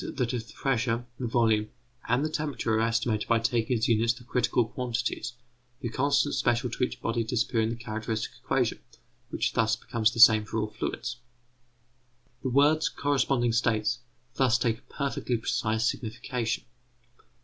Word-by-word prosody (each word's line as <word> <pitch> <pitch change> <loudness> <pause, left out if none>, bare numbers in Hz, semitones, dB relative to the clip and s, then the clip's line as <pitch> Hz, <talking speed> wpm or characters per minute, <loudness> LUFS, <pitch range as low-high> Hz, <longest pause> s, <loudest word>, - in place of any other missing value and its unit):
that 125 -1 -1
if 115 -2 -3
the 110 - -14
pressure, 120 -3 0
the 125 - -2
volume, 110 -2 +2 0.4
and 125 +5 +2
the - - -1
temperature 145 -7 -2
are 110 - +2
estimated 115 -1 0
by 115 - +4
taking 115 +1 +1
as 110 - 0
units 115 0 +3
the 120 +1 -14
critical 120 -1 +1
quantities, 120 0 -3 0.5
the 120 - -2
constants 140 +3 +1
special 120 -1 +1
to 125 - -2
each 125 - -2
body 115 0 0
disappear 115 0 0
in 110 - +1
the 115 - -2
characteristic 110 -1 -4
equation, - - 0 0.5
which - - -1
thus - - +2
becomes 115 -1 0
the 115 - -6
same 110 -2 +8
for 110 - -5
all 105 -1 -1
fluids. 125 +3 -4 1.2
The 130 - -1
words 145 +4 +4
corresponding 135 -4 +1
states 115 -1 +1 0.3
thus 130 -3 +3
take 115 -2 0
a - - -25
perfectly 135 -3 -1
precise 110 0 0
signification. 115 0 -3
115 Hz, 160 wpm, -28 LUFS, 110-125 Hz, 1.2 s, same